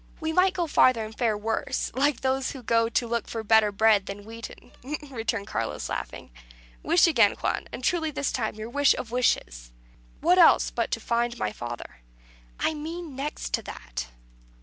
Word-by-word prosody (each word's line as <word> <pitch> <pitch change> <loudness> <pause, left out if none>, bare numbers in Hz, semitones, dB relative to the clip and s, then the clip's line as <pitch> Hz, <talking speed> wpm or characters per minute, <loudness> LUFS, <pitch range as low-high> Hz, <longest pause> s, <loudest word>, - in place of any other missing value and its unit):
"We 320 0 -2
might 370 +2 +3
go 350 - 0
farther 255 -7 +3
and 215 0 -10
fare 225 -3 +1
worse, 220 +2 -2
like 280 +1 +1
those 265 0 0
that 260 -4 -10
go 230 0 +2
to 235 +1 0
look 235 -1 -2
for 225 -1 -4
better 220 -1 +4
bread 205 -1 +3
than 200 +1 -7
wheaten," 230 +1 -10 0.4
returned 225 -4 -2
Carlos, 115 - -3
laughing. 60 0 -6 0.5
"Wish 335 +1 +4
again, 235 - +4
Juan; - - -2
and 255 - -7
truly 320 +3 +1
this 285 -2 -2
time 220 -4 -2
your 220 +2 -7
wish 285 +1 +4
of 235 - -6
wishes." - - 0 0.5
"What 355 +4 +4
else 340 - +6
but - - -1
to - - -1
find 235 0 -1
my 105 - -1
father?" 120 +1 -7 0.6
"I - - +1
mean, 315 0 -6
next 285 +3 -5
to - - +1
that." - - -7
235 Hz, 180 wpm, -26 LUFS, 215-285 Hz, 0.6 s, else